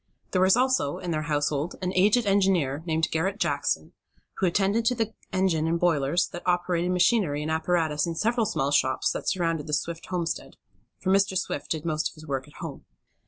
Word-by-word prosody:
There 185 Hz, -, +2 dB
was 190 Hz, +4 st, +5 dB
also, 255 Hz, -, +1 dB
in 175 Hz, -, -4 dB
their 155 Hz, -1 st, 0 dB
household, 145 Hz, +2 st, 0 dB
an 185 Hz, 0 st, -2 dB
aged 210 Hz, +6 st, +3 dB
engineer, 190 Hz, -8 st, +2 dB
named 160 Hz, 0 st, +1 dB
Garret 185 Hz, +5 st, 0 dB
Jackson, -, -, -1 dB, 0.4 s
who 190 Hz, -, +2 dB
attended 200 Hz, +5 st, +1 dB
to 250 Hz, -, +3 dB
the 225 Hz, -1 st, -2 dB, 0.2 s
engine 185 Hz, -4 st, +1 dB
and 170 Hz, +1 st, 0 dB
boilers 165 Hz, -2 st, +2 dB
that 175 Hz, -, -7 dB
operated 175 Hz, 0 st, +1 dB
machinery 180 Hz, -5 st, +2 dB
and 155 Hz, -, -2 dB
apparatus 160 Hz, -2 st, +1 dB
in 165 Hz, -, -3 dB
several 225 Hz, +5 st, +1 dB
small 140 Hz, -9 st, -1 dB
shops 130 Hz, -2 st, +2 dB
that -, -, -2 dB
surrounded 165 Hz, -4 st, -1 dB
the 150 Hz, -, -4 dB
Swift 165 Hz, +2 st, -2 dB
homestead; 170 Hz, -6 st, -3 dB, 0.4 s
for 190 Hz, -, -1 dB
Mr. 195 Hz, -1 st, +3 dB
Swift 145 Hz, -5 st, -3 dB
did 160 Hz, -1 st, -2 dB
most 155 Hz, -1 st, 0 dB
of -, -, -18 dB
his 155 Hz, 0 st, -12 dB
work 135 Hz, -2 st, -3 dB
at 145 Hz, -, -18 dB
home. 155 Hz, -5 st, -7 dB
170 Hz, 195 wpm, -26 LUFS, 155-190 Hz, 0.4 s, was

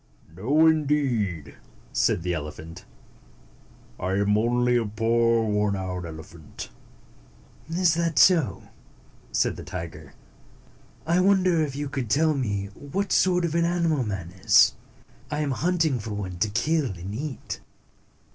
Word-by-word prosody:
"No, 140 Hz, -, +3 dB
indeed," 135 Hz, -, +1 dB, 0.4 s
Said 70 Hz, +7 st, +1 dB
the 90 Hz, 0 st, -1 dB
elephant. 80 Hz, +1 st, -7 dB, 1.1 s
"I 95 Hz, +1 st, -2 dB
am 100 Hz, +1 st, +2 dB
only 120 Hz, +2 st, +2 dB
a 120 Hz, -, +2 dB
poor 115 Hz, +2 st, +1 dB
worn 105 Hz, -1 st, +1 dB
out 90 Hz, -2 st, -4 dB
elephant." 80 Hz, -1 st, -10 dB, 1.0 s
"Is 170 Hz, 0 st, +2 dB
that 165 Hz, -2 st, -1 dB
so?" 170 Hz, -8 st, +4 dB, 0.7 s
said -, -, +1 dB
the -, -, -8 dB
tiger. 80 Hz, -5 st, -8 dB, 0.9 s
"I 170 Hz, +3 st, +2 dB
wonder 185 Hz, -3 st, +3 dB
if 145 Hz, -3 st, -2 dB
you 145 Hz, +1 st, -3 dB
can 135 Hz, -3 st, -4 dB
tell 155 Hz, +7 st, +3 dB
me 100 Hz, -8 st, -2 dB
what 185 Hz, -, -4 dB
sort 180 Hz, -2 st, +3 dB
of 165 Hz, -, -2 dB
an 170 Hz, 0 st, +2 dB
animal 170 Hz, -5 st, +1 dB
man 95 Hz, -6 st, -5 dB
is? 95 Hz, +1 st, +5 dB, 0.6 s
I 150 Hz, 0 st, -2 dB
am 145 Hz, -2 st, -1 dB
hunting 160 Hz, -2 st, +1 dB
for 105 Hz, 0 st, -5 dB
one 95 Hz, -3 st, -5 dB
to 110 Hz, -, +1 dB
kill 150 Hz, +9 st, +1 dB
and 95 Hz, -1 st, -7 dB
eat." 135 Hz, +3 st, -5 dB
120 Hz, 135 wpm, -25 LUFS, 95-155 Hz, 1.1 s, is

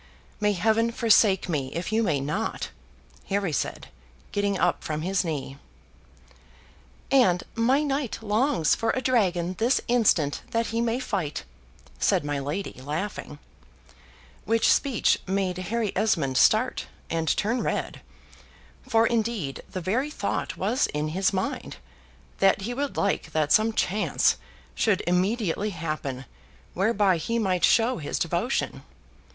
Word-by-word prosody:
"May 210 Hz, -1 st, +2 dB
heaven 220 Hz, +4 st, +2 dB
forsake 215 Hz, -5 st, +4 dB
me 140 Hz, -6 st, -2 dB
if 170 Hz, +5 st, -3 dB
you 220 Hz, +1 st, +2 dB
may 160 Hz, -10 st, +1 dB
not!" 170 Hz, +11 st, -3 dB, 0.6 s
Harry 195 Hz, -4 st, 0 dB
said, 95 Hz, -, -3 dB, 0.4 s
getting 200 Hz, -1 st, 0 dB
up -, -, +1 dB
from 155 Hz, 0 st, -3 dB
his 190 Hz, +2 st, +1 dB
knee. 140 Hz, -4 st, -4 dB, 1.5 s
"And 190 Hz, -10 st, +4 dB
my 255 Hz, +6 st, +2 dB
knight 275 Hz, -4 st, -1 dB
longs 220 Hz, -, +2 dB
for 225 Hz, -, -1 dB
a 260 Hz, -, -1 dB
dragon 185 Hz, -8 st, +1 dB
this 240 Hz, +4 st, +3 dB
instant 205 Hz, -12 st, +2 dB
that 230 Hz, 0 st, 0 dB
he 230 Hz, -, +1 dB
may 235 Hz, +1 st, 0 dB
fight," 190 Hz, -, -3 dB, 0.6 s
said 145 Hz, -, +2 dB
my 145 Hz, -1 st, -1 dB
lady, 145 Hz, +1 st, -4 dB
laughing; 150 Hz, +1 st, -4 dB, 1.1 s
which 225 Hz, +2 st, +4 dB
speech 270 Hz, -6 st, +2 dB
made 190 Hz, -1 st, -1 dB
Harry 210 Hz, +3 st, -2 dB
Esmond 160 Hz, -12 st, +1 dB
start, 220 Hz, -, +3 dB, 0.2 s
and 165 Hz, -1 st, -1 dB
turn 235 Hz, +4 st, 0 dB
red; -, -, -3 dB, 0.9 s
for 225 Hz, 0 st, +4 dB
indeed 220 Hz, -, -1 dB
the 185 Hz, -, -5 dB
very 235 Hz, -, 0 dB
thought 300 Hz, -, -3 dB
was 255 Hz, -, +1 dB
in 150 Hz, +1 st, -2 dB
his 185 Hz, +4 st, +1 dB
mind, 190 Hz, -1 st, -3 dB, 0.6 s
that 195 Hz, 0 st, +4 dB
he 230 Hz, +5 st, -3 dB
would 280 Hz, +2 st, -3 dB
like 195 Hz, -5 st, -1 dB
that 155 Hz, -2 st, +1 dB
some 220 Hz, +1 st, +4 dB
chance 210 Hz, -1 st, +1 dB, 0.4 s
should 205 Hz, -5 st, +1 dB
immediately 195 Hz, +2 st, 0 dB
happen 155 Hz, -7 st, -4 dB, 0.5 s
whereby 195 Hz, -1 st, +2 dB
he 230 Hz, +8 st, -2 dB
might 190 Hz, -5 st, 0 dB
show 235 Hz, +2 st, +4 dB
his 145 Hz, -, -3 dB
devotion. -, -, -1 dB
200 Hz, 135 wpm, -26 LUFS, 165-230 Hz, 1.5 s, forsake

